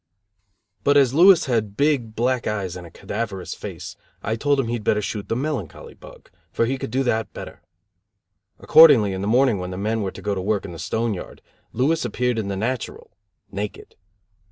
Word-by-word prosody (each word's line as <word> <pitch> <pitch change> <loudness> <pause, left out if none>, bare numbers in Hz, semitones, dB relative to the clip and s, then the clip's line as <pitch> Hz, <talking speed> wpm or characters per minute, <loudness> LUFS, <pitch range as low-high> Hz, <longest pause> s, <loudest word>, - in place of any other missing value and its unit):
But 145 +3 +4
as 135 -4 +4
Billy 185 +6 +8
had 110 -6 -1
big, 135 -7 +1
black 125 +1 0
eyes 95 -4 -3
and 90 -1 -9
a - - -13
cadaverous 100 0 -5
face, 95 -1 -8 0.3
I 110 - -1
told 145 +3 +1
him 130 - 0
he'd 115 -2 -3
better 105 - +2
shoot 105 0 -5
the - - 0
melancholy 130 - -4
bug; - - -16 0.2
for 115 - +1
he 130 +3 -2
could - - -5
do 130 +4 0
that 110 -3 -1
better. - - -9 1.0
Accordingly 125 -11 +6
in 95 - -4
the 100 - -2
morning 120 -2 +3
when 90 0 -5
the 90 - -6
men 110 +3 -1
were 100 - -2
to - - -11
go 105 - -1
to 95 - -3
work 105 +1 -1
in 95 - -7
the 85 - -9
stone 110 +7 -1
yard, 90 - -9 0.3
Billy 135 +7 +1
appeared 125 0 -1
in 105 - -3
the 100 -1 -3
natural 120 +4 -4 0.4
(naked). 100 +1 -6
110 Hz, 200 wpm, -22 LUFS, 100-130 Hz, 1.0 s, Billy